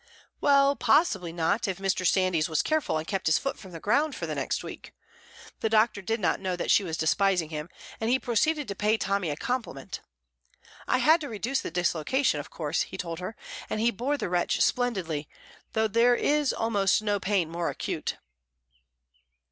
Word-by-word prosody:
Well, 280 0 +4
possibly 205 - +2
not, 170 +7 0
if 190 -2 -2
Mr. 190 -1 0
Sandys 185 -4 +2
was 160 - +1
careful 310 - 0
and 155 - -4
kept 190 0 -2
his 155 - +4
foot 275 - -3
from 190 - -11
the 165 - -8
ground 285 - +1
for - - -4
the - - -3
next - - -2
week. - - -10 0.6
The 220 - 0
doctor 215 -1 +3
did 225 +4 -1
not 190 - +1
know 185 -2 -2
that 175 - -1
she 205 - +5
was 165 -3 -3
despising 180 0 +2
him, 150 +2 -5 0.3
and 225 - -1
he 255 - +4
proceeded 280 +5 0
to 200 - -3
pay 210 +3 +1
Tommy 195 -5 -1
a 145 - -2
compliment. 245 - -4 0.9
"I - - +3
had 320 +2 +4
to 290 - -5
reduce 235 +5 -2
the - - -5
dislocation, 175 - +1
of 145 - -7
course," 155 -1 -2
he - - -5
told 170 -2 -5
her, 185 +5 -6 0.3
"and - - -2
he 230 +2 +3
bore 255 +7 -1
the 230 - -3
wrench 175 -1 0
splendidly, 185 - 0 0.4
though 220 0 +2
there 230 +3 +4
is 295 +2 +2
almost 210 -3 +1
no 205 -1 0
pain 190 -3 +1
more 170 +1 -2
acute." - - -3
200 Hz, 190 wpm, -27 LUFS, 175-240 Hz, 0.9 s, she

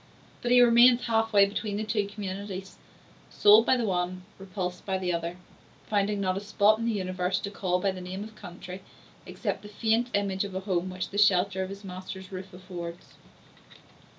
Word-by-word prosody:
But 240 - -2
he 245 0 +7
remains 240 +1 +6
half 225 -1 +1
way 200 -2 +6
between 205 +1 -3
the 215 - -2
two 215 -2 -1
communities; 195 -1 -6 0.5
sold 210 +2 +6
by 260 - +4
the 240 - 0
one, 180 -1 -2 0.2
repulsed 185 -2 -5
by 190 -1 -1
the 180 -1 -1
other; 170 +1 -3 0.5
finding 205 0 0
not 185 -2 0
a - - -2
spot 210 +1 +3
in 230 - -2
the 235 - +1
universe 185 -3 -1
to 200 - -5
call 180 -3 -1
by 195 +1 +1
the 185 -1 -8
name 185 +2 -5
of 220 +1 -10
country, 180 0 -9 0.5
except - - -3
the 210 - -11
faint 225 +3 +1
image 200 -1 0
of 200 -2 -6
a 190 - -2
home 185 -2 -1
which 185 0 -5
the 205 - -2
shelter 190 -1 +3
of 190 - -3
his 200 +1 -9
master's 185 0 -8
roof 190 0 -7
affords. 180 -2 -8
195 Hz, 195 wpm, -28 LUFS, 185-210 Hz, 0.5 s, he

